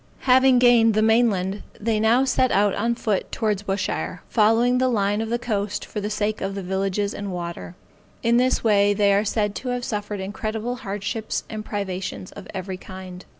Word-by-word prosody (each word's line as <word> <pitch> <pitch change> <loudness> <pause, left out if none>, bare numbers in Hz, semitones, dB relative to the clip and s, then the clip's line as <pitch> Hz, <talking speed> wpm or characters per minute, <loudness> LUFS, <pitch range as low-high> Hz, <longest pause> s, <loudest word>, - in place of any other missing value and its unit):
Having 260 0 +5
gained 235 -3 +5
the 215 - +3
main 225 +2 +4
land 190 0 -2 0.2
they 220 0 0
now 230 +5 +4
set 255 -1 +2
out 205 0 +3
on 235 +3 0
foot 215 -4 -2
towards 210 -3 -1
Bushire, 195 -1 -3
following 230 +3 +3
the 255 - +3
line 205 -3 +1
of 225 - -3
the 235 - +1
coast 210 -4 -2
for 210 - -5
the 205 - -3
sake 210 0 -1
of 195 0 -3
the 195 - -4
villages 195 +2 -1
and 200 -1 -5
water. 170 0 -6 0.5
In 235 +1 +3
this 255 +1 +3
they 205 -2 +3
are 200 +1 +3
said 210 -1 0
to 260 - -7
have 245 0 -2
suffered 205 -1 -3
incredible 220 +4 -4
hardships 205 +1 -3
and 215 -1 -5
privations 190 -3 -4
of - - -11
every 190 0 -5
kind. 185 -1 -10
210 Hz, 190 wpm, -23 LUFS, 195-230 Hz, 0.5 s, Having